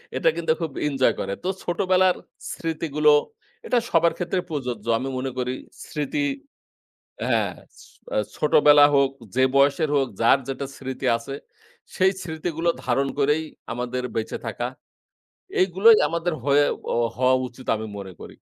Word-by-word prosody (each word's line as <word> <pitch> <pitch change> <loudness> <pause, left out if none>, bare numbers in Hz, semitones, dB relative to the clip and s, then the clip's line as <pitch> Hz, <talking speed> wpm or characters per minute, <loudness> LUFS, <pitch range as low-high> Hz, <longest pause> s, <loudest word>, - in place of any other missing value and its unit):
এটা - - +3
কিন্তু 165 -1 0
খুব 160 -4 -2 0.2
এনজয় 135 -3 +2
করে। 100 - -2
তো 180 - -3 0.2
ছোটবেলার 185 +1 +2 0.4
স্মৃতিগুলো, 155 -2 0 0.6
এটা 250 - +1
সবার 165 0 +3
ক্ষেত্রে 180 +1 -1
প্রযোজ্য। 125 -7 -4
আমি 135 - -3
মনে 130 +1 -3
করি 125 0 -1 0.4
স্মৃতি 150 - -3 1.1
হ্যাঁ, - - +2
হ্যাঁ। - - -17 0.2
সি - - -15 0.3
আ - - +2 0.2
ছোটবেলা 150 -1 +6
হোক, 140 -1 +4 0.2
যে 130 - +3
বয়সের 140 +2 +3
হোক, 135 - +2
যার 115 +4 +5
যেটা 135 +1 -3
স্মৃতি 130 -1 -5
আছে, 115 +4 -7 0.6
সেই 190 +1 +4
স্মৃতিগুলো 165 0 -3 0.2
ধারণ 135 +2 +1
করেই 150 +2 +2 0.3
আমাদের 125 +1 -3
বেঁচে 110 - -2
থাকা। - - -3 0.9
এইগুলোই 195 +5 +6
আমাদের 170 +1 -1
হয়ে 145 +1 +4 0.3
অ - - 0 0.2
হওয়া 130 +1 +3
উচিত, 130 +2 -15
আমি 110 0 -5
মনে 95 -2 -8
করি। - - -10
145 Hz, 145 wpm, -24 LUFS, 130-170 Hz, 1.1 s, ছোটবেলা